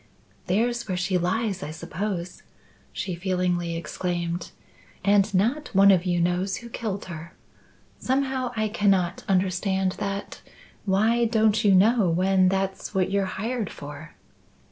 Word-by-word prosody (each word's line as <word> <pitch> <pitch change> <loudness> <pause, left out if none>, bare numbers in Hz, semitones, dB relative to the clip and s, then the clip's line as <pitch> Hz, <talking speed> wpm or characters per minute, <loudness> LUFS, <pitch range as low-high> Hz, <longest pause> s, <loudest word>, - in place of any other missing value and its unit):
"There's 235 +5 0
where 185 -2 -2
she 180 0 0
lies, 190 +2 -1
I 145 - -5
suppose," 180 +3 -5 0.5
she 185 - -4
feelingly 175 -1 -1
exclaimed. 170 +1 -3 0.6
"And 200 0 +4
not 235 +11 +1
one 200 +1 +7
of 185 -1 +3
you 175 -1 +1
knows 180 +3 0
who 235 - -10
killed 215 -4 -4
her. 170 -2 -9 0.6
Somehow, 260 -1 0
I 215 -1 0
cannot 195 -4 +1
understand 190 0 +1
that. 200 0 -4 0.4
Why 220 +5 +3
don't 220 -1 +2
you 200 -2 +5
know 210 0 +4
when 185 +2 +3
that's 195 +1 -2
what 190 0 +1
you're 200 -1 +1
hired 225 -1 -2
for?" 145 +2 -10
190 Hz, 135 wpm, -25 LUFS, 180-215 Hz, 0.6 s, one